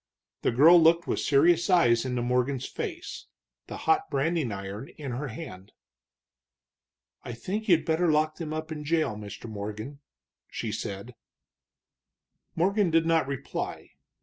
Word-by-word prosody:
The -, -, +2 dB
girl 160 Hz, +8 st, +7 dB
looked 165 Hz, +1 st, +4 dB
with -, -, -1 dB
serious 165 Hz, +6 st, +3 dB
eyes 125 Hz, -10 st, +4 dB
into 125 Hz, -2 st, -2 dB
Morgan's 125 Hz, +2 st, 0 dB
face, 355 Hz, -7 st, -6 dB, 0.4 s
the -, -, -7 dB
hot 400 Hz, 0 st, +2 dB
branding 155 Hz, -3 st, 0 dB
iron 100 Hz, +5 st, -6 dB
in 140 Hz, -4 st, -5 dB
her 135 Hz, +4 st, -4 dB
hand. 110 Hz, -, -9 dB, 1.5 s
"I 120 Hz, -, -6 dB
think 205 Hz, -, -4 dB
you'd 170 Hz, -5 st, +4 dB
better 160 Hz, +1 st, +2 dB
lock 155 Hz, 0 st, +1 dB
them 160 Hz, -3 st, -5 dB
up 155 Hz, +1 st, -5 dB
in 150 Hz, -1 st, -5 dB
jail, 155 Hz, -6 st, 0 dB
Mr. 105 Hz, +1 st, -8 dB
Morgan," 110 Hz, +6 st, -6 dB, 0.5 s
she 115 Hz, -, -4 dB
said. 105 Hz, +2 st, -5 dB, 1.4 s
Morgan 195 Hz, +3 st, +2 dB
did 165 Hz, 0 st, +3 dB
not 165 Hz, -3 st, +2 dB
reply. 140 Hz, -2 st, -5 dB
150 Hz, 140 wpm, -27 LUFS, 120-165 Hz, 1.5 s, girl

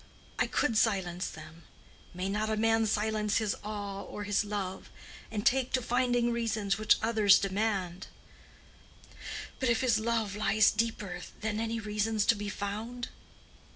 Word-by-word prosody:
I -, -, +3 dB
could 230 Hz, -7 st, +1 dB
silence 190 Hz, -5 st, 0 dB
them: 160 Hz, +1 st, -11 dB, 0.5 s
may 180 Hz, +1 st, -3 dB
not 210 Hz, +2 st, -1 dB
a 220 Hz, -, 0 dB
man 225 Hz, 0 st, +3 dB
silence 210 Hz, 0 st, +1 dB
his 215 Hz, -3 st, 0 dB
awe 205 Hz, -2 st, -4 dB
or 205 Hz, -, -7 dB
his 205 Hz, 0 st, +1 dB
love, 200 Hz, -2 st, -4 dB, 0.4 s
and 210 Hz, -1 st, -4 dB
take 260 Hz, 0 st, +2 dB
to 255 Hz, -, +3 dB
finding 245 Hz, 0 st, +2 dB
reasons, 215 Hz, -4 st, 0 dB
which 215 Hz, -, +4 dB
others 220 Hz, -3 st, +5 dB
demand? 195 Hz, -3 st, -1 dB, 1.5 s
But 260 Hz, -, +1 dB
if 230 Hz, -1 st, +2 dB
his 235 Hz, -4 st, +3 dB
love 220 Hz, -3 st, -1 dB
lies 210 Hz, 0 st, +4 dB
deeper 210 Hz, -5 st, -2 dB, 0.2 s
than 215 Hz, 0 st, -1 dB
any 230 Hz, 0 st, -1 dB
reasons 210 Hz, 0 st, 0 dB
to 230 Hz, -, +5 dB
be 205 Hz, 0 st, -4 dB
found? 220 Hz, +5 st, -4 dB
215 Hz, 150 wpm, -30 LUFS, 200-225 Hz, 1.5 s, others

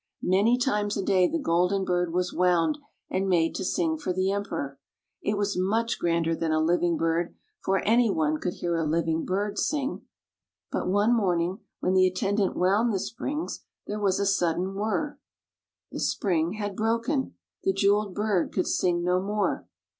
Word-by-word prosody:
Many 205 Hz, +7 st, +3 dB
times 210 Hz, -5 st, 0 dB
a 195 Hz, -, -1 dB
day 185 Hz, -2 st, +4 dB
the 330 Hz, -, -1 dB
golden 185 Hz, -, +1 dB
bird 180 Hz, -1 st, 0 dB
was 180 Hz, +1 st, -1 dB
wound 180 Hz, -, +2 dB, 0.3 s
and 190 Hz, +1 st, 0 dB
made 165 Hz, -3 st, +2 dB
to -, -, -3 dB
sing 320 Hz, -, 0 dB
for 240 Hz, -, -2 dB
the 185 Hz, +1 st, +1 dB
Emperor. 140 Hz, -9 st, -3 dB, 0.4 s
It 205 Hz, 0 st, -1 dB
was 200 Hz, 0 st, 0 dB
much 225 Hz, +5 st, 0 dB
grander 165 Hz, -1 st, +1 dB
than 160 Hz, 0 st, -1 dB
a 155 Hz, -, +2 dB
living 170 Hz, +1 st, +2 dB
bird, 165 Hz, +1 st, 0 dB, 0.3 s
for 195 Hz, 0 st, +1 dB
anyone 195 Hz, -10 st, +2 dB
could 180 Hz, -, -3 dB
hear 170 Hz, -1 st, -2 dB
a 165 Hz, -, 0 dB
living 160 Hz, +1 st, 0 dB
bird 205 Hz, +2 st, -1 dB
sing. 285 Hz, -2 st, -1 dB, 0.7 s
But -, -, -2 dB
one 205 Hz, +5 st, +3 dB
morning 180 Hz, -2 st, 0 dB, 0.2 s
when 185 Hz, -, +1 dB
the 185 Hz, 0 st, +5 dB
attendant 195 Hz, +2 st, 0 dB
wound 200 Hz, +6 st, +3 dB
the 195 Hz, -, 0 dB
springs, 290 Hz, -, -4 dB, 0.2 s
there 210 Hz, -, -4 dB
was 195 Hz, -2 st, +1 dB
a 200 Hz, -, +1 dB
sudden 185 Hz, -1 st, +1 dB
whirr. 215 Hz, +9 st, -2 dB, 0.7 s
The -, -, -5 dB
spring 170 Hz, -3 st, 0 dB
had 205 Hz, -2 st, -4 dB
broken. 230 Hz, +6 st, 0 dB, 0.3 s
The 385 Hz, -, +3 dB
jeweled 205 Hz, -, +2 dB
bird 210 Hz, -4 st, 0 dB
could 185 Hz, -, 0 dB
sing 175 Hz, -1 st, +1 dB
no 180 Hz, +1 st, +2 dB
more. 205 Hz, +1 st, -1 dB
190 Hz, 170 wpm, -27 LUFS, 175-210 Hz, 0.7 s, the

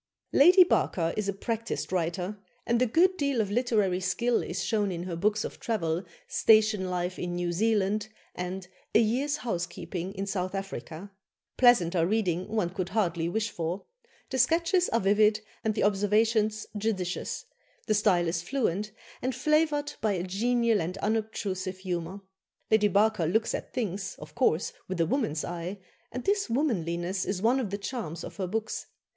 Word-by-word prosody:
" -, -, -47 dB
Lady 360 Hz, +4 st, +9 dB
Barker 170 Hz, -, +1 dB
is 210 Hz, -2 st, -1 dB
a -, -, 0 dB
practised 230 Hz, +2 st, -3 dB
writer, 180 Hz, +3 st, -2 dB, 0.3 s
and 235 Hz, +1 st, +1 dB
a 255 Hz, -, +4 dB
good 365 Hz, +10 st, +3 dB
deal 280 Hz, -5 st, 0 dB
of 205 Hz, -2 st, 0 dB
literary 210 Hz, -6 st, +1 dB
skill 235 Hz, +6 st, +1 dB
is -, -, -3 dB
shown 210 Hz, -3 st, 0 dB
in 175 Hz, -1 st, -4 dB
her 180 Hz, -2 st, -4 dB
books 210 Hz, +5 st, +1 dB
of -, -, -6 dB
travel, 175 Hz, -6 st, -1 dB, 0.2 s
"Station 215 Hz, -3 st, +4 dB
Life 180 Hz, 0 st, -2 dB
in 175 Hz, 0 st, -3 dB
New 175 Hz, 0 st, -1 dB
Zealand" 210 Hz, +1 st, +1 dB, 0.3 s
and 180 Hz, +1 st, -5 dB, 0.3 s
"A -, -, +8 dB
Year's 260 Hz, +7 st, +1 dB
Housekeeping 180 Hz, -1 st, -4 dB
in 195 Hz, +1 st, -3 dB
South 185 Hz, -1 st, -2 dB
Africa." 195 Hz, -1 st, -6 dB, 0.4 s
Pleasanter 180 Hz, -9 st, +4 dB
reading 185 Hz, -4 st, 0 dB
one 210 Hz, -5 st, -1 dB
could 185 Hz, -1 st, -3 dB
hardly 170 Hz, -6 st, 0 dB
wish 220 Hz, +3 st, -1 dB
for; 170 Hz, +3 st, -3 dB, 0.5 s
the 260 Hz, -, -1 dB
sketches 335 Hz, +7 st, +3 dB
are 230 Hz, -, +2 dB
vivid, 210 Hz, +2 st, +4 dB, 0.2 s
and 220 Hz, -1 st, 0 dB
the -, -, +1 dB
observations 215 Hz, +2 st, +2 dB
judicious; 200 Hz, -4 st, -2 dB, 0.4 s
the 215 Hz, -, +2 dB
style 195 Hz, -5 st, +3 dB
is 165 Hz, 0 st, -1 dB
fluent, 210 Hz, -1 st, -1 dB, 0.3 s
and 255 Hz, -1 st, -1 dB
flavoured 300 Hz, +1 st, +1 dB
by 215 Hz, -2 st, +2 dB
a 175 Hz, -2 st, -2 dB
genial 230 Hz, +3 st, +1 dB
and 180 Hz, +4 st, -3 dB
unobtrusive 200 Hz, -3 st, -2 dB
humour. 185 Hz, 0 st, -4 dB, 0.5 s
Lady 215 Hz, -1 st, +5 dB
Barker 205 Hz, -3 st, +2 dB
looks 220 Hz, +7 st, +1 dB
at -, -, -4 dB
things, 200 Hz, -5 st, -3 dB
of -, -, -11 dB
course, 180 Hz, -10 st, +1 dB
with 185 Hz, -2 st, -4 dB
a 165 Hz, -, +4 dB
woman's 165 Hz, -, -1 dB
eye, 175 Hz, +3 st, -5 dB, 0.3 s
and 250 Hz, +1 st, -5 dB
this 400 Hz, -6 st, +1 dB
womanliness 185 Hz, -, 0 dB
is 195 Hz, -2 st, -2 dB
one 245 Hz, +4 st, +4 dB
of 235 Hz, -6 st, -2 dB
the 200 Hz, -, -3 dB
charms 200 Hz, -6 st, -5 dB
of -, -, -8 dB
her 190 Hz, -2 st, -2 dB
books. 220 Hz, +3 st, -3 dB
205 Hz, 170 wpm, -28 LUFS, 180-225 Hz, 0.5 s, Lady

